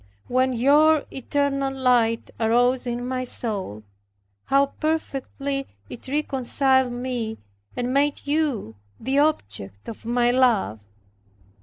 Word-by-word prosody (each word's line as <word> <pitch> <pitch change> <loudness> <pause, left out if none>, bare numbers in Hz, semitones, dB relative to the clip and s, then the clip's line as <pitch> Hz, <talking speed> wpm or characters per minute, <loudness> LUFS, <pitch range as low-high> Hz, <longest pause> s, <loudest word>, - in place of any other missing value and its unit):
When 255 +1 +1
your 290 +5 +4
eternal 275 0 -1
light 245 -4 +1
arose 245 +3 +2
in 240 +1 -3
my 255 0 -2
soul, 200 - -1 0.6
how 275 +1 +3
perfectly 280 -3 -2 0.2
it 240 - -8
reconciled 265 -2 +1
me 245 -3 -4 0.4
and 245 +1 -1
made 285 +1 +1
you 285 - -1 0.2
the 265 +4 0
object 100 - -2
of 225 - -8
my 240 +1 +2
love! 240 - +2
255 Hz, 110 wpm, -23 LUFS, 235-275 Hz, 0.6 s, your